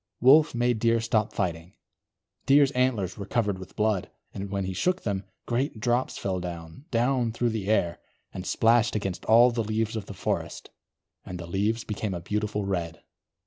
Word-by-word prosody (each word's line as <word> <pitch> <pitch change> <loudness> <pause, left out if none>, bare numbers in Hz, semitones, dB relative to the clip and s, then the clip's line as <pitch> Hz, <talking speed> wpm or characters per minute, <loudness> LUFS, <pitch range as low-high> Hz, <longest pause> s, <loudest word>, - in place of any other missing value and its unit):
Wolf 140 +3 +6
made 120 -1 +1
Deer 115 0 +3
stop 110 -2 0
fighting. 85 -1 -3 0.7
Deer's 140 0 +5
antlers 125 -8 0
were 100 - -6
covered 105 -5 0
with 95 0 -11
blood, 105 -4 0 0.2
and 100 0 -5
when 100 -1 -2
he 95 - -3
shook 180 - 0
them, 100 -3 -2 0.2
great 120 -1 -1
drops 120 +3 0
fell 95 -2 -2
down, 85 - -8
down 120 0 +1
through 120 +1 0
the 110 -3 -4
air, 85 -6 +1 0.3
and 90 - -5
splashed 115 0 +3
against 95 -3 -3
all 120 +2 +6
the 115 -1 -1
leaves 110 +1 -1
of 105 -3 -5
the 100 - -8
forest. - - -3 0.5
And 90 - -7
the 85 - -6
leaves 105 +6 -1
became 105 -2 -3
a - - -4
beautiful 105 +3 -2
red. 85 -4 -3
110 Hz, 180 wpm, -27 LUFS, 95-120 Hz, 0.7 s, Wolf